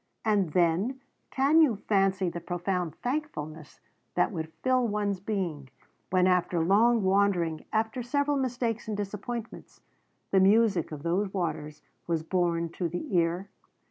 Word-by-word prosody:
And 200 -7 +1
then 180 +9 +2 0.3
can 285 +5 +4
you 275 -8 +4
fancy 195 -2 +1
the 170 0 -4
profound 175 -1 -2
thankfulness 165 - -4 0.4
that - - +2
would 160 0 -5
fill 255 -2 +3
one's 205 -2 -1
being, 180 -9 -3 0.4
when 185 0 +3
after 180 -1 +2
long 215 +6 +4
wandering, 190 -5 +1
after 220 +3 0
several 285 +4 0
mistakes 245 -4 -2
and 215 -2 -3
disappointments, 210 +3 -6 0.5
the 195 - +5
music 200 -3 +3
of 150 -1 -7
those 190 +4 0
waters 155 -5 -4 0.2
was 165 -2 0
borne 170 -1 0
to 170 +1 -3
the 175 +3 -4
ear? 175 +3 +1
190 Hz, 140 wpm, -28 LUFS, 170-220 Hz, 0.5 s, the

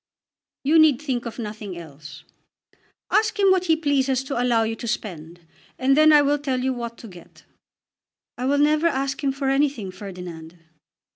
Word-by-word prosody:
"You 310 +4 +4
need 310 -5 +5
think 255 -5 -3
of 230 - -8
nothing 210 -5 -6
else. 155 -2 -11 0.9
Ask 440 0 +2
him 395 -2 +4
what 370 -1 +2
he 325 -2 +3
pleases 275 -4 0
to 265 -2 -3
allow 240 -2 +2
you 225 0 -2
to 235 - -7
spend, 175 -6 -5 0.4
and 270 +1 +2
then 310 +1 +6
I 295 -1 +6
will 290 +1 +1
tell 270 -3 -2
you 260 +1 0
what 235 -1 -6
to 230 - -11
get." 180 -4 -15 0.9
"I 250 - -4
will 280 +2 +2
never 300 +3 +3
ask 275 -2 -2
him 275 - +2
for 270 0 -4
anything, 270 -8 0
Ferdinand." 180 -4 -9
260 Hz, 180 wpm, -23 LUFS, 210-290 Hz, 0.9 s, then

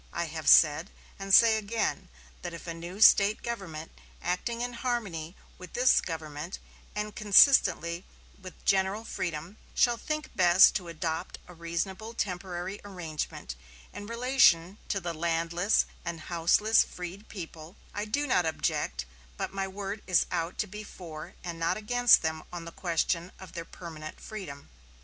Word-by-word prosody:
I 170 - -2
have 160 -2 -2
said, 160 +4 +6 0.3
and 195 0 -4
say 220 +1 +7
again, 210 -3 -2 0.3
that 175 -1 -6
if 170 - -10
a 170 - -4
new 175 +5 -8
State 210 -1 +6
government, 180 -9 -5 0.3
acting 230 +7 -2
in 245 0 -3
harmony 210 -9 -3 0.2
with 180 -1 -11
this 255 +1 +4
government 160 +1 -6 0.4
and 210 0 -3
consistently 195 -5 +5 0.4
with 185 -1 -12
general 195 +3 +2
freedom, 170 -1 -5 0.2
shall 240 -2 +3
think 305 +4 -4
best 180 +1 +7
to 180 -4 -9
adopt 160 -1 -4
a 180 - -12
reasonable 190 +6 -4
temporary 180 -1 -4
arrangement 165 - -5 0.4
in 205 - -8
relation 230 -7 +3
to 195 - -1
the 175 -2 -4
landless 170 +4 +1 0.2
and 170 -1 -5
houseless 175 +7 +3
freed 180 +4 -9
people, 165 -2 -9 0.2
I 205 0 -3
do 285 +8 -1
not 180 - +2
object; 65 - -1 0.3
but - - -4
my 195 0 -2
word 200 +2 -5
is 185 -2 +4
out 170 0 -2
to - - -16
be 210 +2 -8
for 170 -3 -10
and 170 -2 -6
not 165 - +1
against 245 +1 +4
them 160 0 -2
on 175 -1 -6
the 170 - -8
question 170 0 -1
of 190 -3 -11
their 170 -1 -6
permanent 155 -3 -9
freedom." 165 - -8
180 Hz, 155 wpm, -29 LUFS, 165-210 Hz, 0.4 s, say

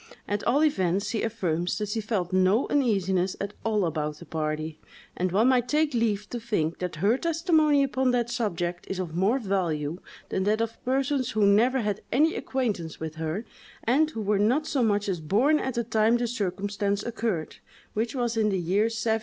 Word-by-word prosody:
At 205 0 -2
all 285 +5 +3
events, 195 - +1
she 220 -1 -1
affirms 180 -6 -1
that 210 -1 -3
she 220 +2 -1
felt 200 -5 -2
no 185 +6 +3
uneasiness 195 -9 +1
at 200 +1 -4
all 215 -4 +1
about 150 -2 -2
the 170 - -12
party, 155 0 -3 0.4
and 185 0 -1
one 220 +7 +4
might 250 -2 +3
take 300 -1 +2
leave 215 -3 0
to 240 - -3
think 190 -9 -1
that 180 -2 -3
her 230 +6 +3
testimony 320 -3 +3
upon 265 -1 +1
that 240 -1 +1
subject 175 -7 -2
is 195 - -3
of 175 -4 -4
more 195 +8 +2
value 175 - -1 0.3
than 190 - -1
that 215 +2 +2
of 230 0 -3
persons 265 0 0
who 215 -1 +3
never 235 +6 +4
had 210 -1 -2
any 310 +6 +3
acquaintance 210 -12 -3
with 160 -1 -5
her, 160 +7 -3 0.4
and 290 +7 +3
who 225 -8 -5
were 205 0 +1
not 250 +9 +2
so 280 -4 0
much 205 -3 +1
as 185 -4 -1
born 240 - +3
at 260 -1 -3
the 235 - 0
time 220 +1 +3
the 240 - -1
circumstance 200 -2 -2
occurred, 220 -8 -3 0.4
which 225 +4 -2
was 240 -2 -1
in 220 -1 +2
the 195 - 0
year 185 +5 +1
1731. 225 0 0
215 Hz, 195 wpm, -27 LUFS, 185-245 Hz, 0.4 s, one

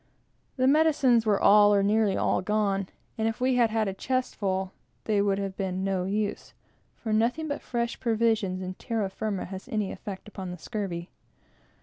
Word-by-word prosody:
The 255 - +2
medicines 270 -6 +4
were 205 -2 +3
all, 205 0 +6
or 200 - +3
nearly 210 -1 +2
all, - - +1
gone; 200 -1 0 0.3
and 220 - +1
if 225 - -2
we 255 +1 +2
had 235 -2 +4
had 220 -1 0
a 195 - -2
chest 255 +6 -2
full, 190 -2 -1 0.3
they 210 -2 +1
would 200 -1 +1
have 195 -1 -3
been 190 -2 -2
of 190 - -2
no 190 -2 0
use; 205 +1 -3 0.4
for 220 -2 -3
nothing 240 +9 +1
but 285 -1 -3
fresh 235 -1 -3
provisions 220 -5 +1
and 185 0 -6
terra 220 -4 -2
firma 210 -2 -3
has 190 +1 -8
any 210 -3 -1
effect 200 -2 -8
upon 190 -3 -7
the 180 - -6
scurvy. 180 -3 -5
210 Hz, 190 wpm, -27 LUFS, 195-230 Hz, 0.4 s, all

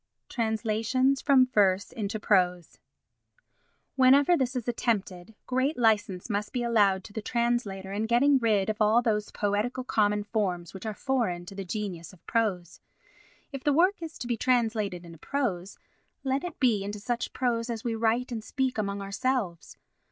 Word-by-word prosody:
Translations 230 +4 0
from 270 -3 +5
Verse 200 -6 +2
into 215 -1 -4
Prose 180 -5 +1 1.2
Whenever 270 +5 +5
this 260 -3 -1
is 250 -2 -3
attempted, 215 -5 -2
great 260 +4 0
licence 205 -6 +1
must 210 -2 -2
be 245 -2 -1
allowed 205 -5 +3
to 205 - -13
the 220 - -4
translator 220 -5 -1
in 215 +2 -1
getting 265 +4 +4
rid 215 -5 +2
of 215 0 -3
all 220 +3 +4
those 210 -3 0
poetical 210 +5 -1
common 210 -4 +1
forms 190 -5 -2
which 195 +3 -7
are 215 - -4
foreign 225 -11 -1
to 185 - -10
the 195 0 -5
genius 185 -3 -5
of 180 - -20
prose. 200 -7 -1 0.7
If 275 -2 -7
the 295 - +2
work 360 +5 +3
is 325 -1 -7
to - - -6
be 240 -1 -1
translated 220 -7 0
into 165 -2 -12
prose, 205 - -3 0.5
let 270 +1 -1
it 355 - -6
be 230 -7 +2
into 205 +1 -5
such 240 +3 -3
prose 240 -2 -1
as 230 -2 -4
we 235 - -1
write 230 +3 0
and 225 -2 -4
speak 260 -1 -2
among 200 -1 -2
ourselves. 200 -4 -2
220 Hz, 165 wpm, -28 LUFS, 200-250 Hz, 1.2 s, from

